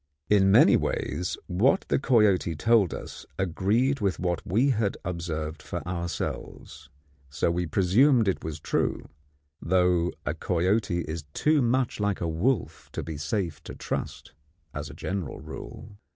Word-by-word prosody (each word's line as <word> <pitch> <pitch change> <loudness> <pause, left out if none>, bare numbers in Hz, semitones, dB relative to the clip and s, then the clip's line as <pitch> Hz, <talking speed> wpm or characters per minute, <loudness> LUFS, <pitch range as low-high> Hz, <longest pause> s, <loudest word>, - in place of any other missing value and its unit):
In 95 -2 +5
many 95 - +7
ways 90 - -2
what 115 - +2
the - - +2
coyote 105 -10 +3
told 110 +1 +3
us - - -7
agreed 105 - +1
with 100 -4 0
what 90 -2 -1
we 120 +10 +3
had 110 -4 0
observed 80 -3 -4
for - - -6
ourselves, 85 -1 -5 0.4
so 70 +4 0
we 90 0 -1
presumed 110 - +4
it 95 - 0
was 80 -1 -5
true; - - -1 0.5
though 90 0 +2
a 75 - 0
coyote 90 +3 0
is 80 -1 -5
too 150 -1 +3
much 125 0 +1
like 105 -2 0
a 85 - -1
wolf 90 +8 -1
to - - -3
be 80 - -6
safe 85 +3 -2
to - - -9
trust - - -5 0.4
as - - -5
a - - -10
general 90 -8 -4
rule. 100 -1 -10
95 Hz, 150 wpm, -27 LUFS, 85-110 Hz, 0.5 s, many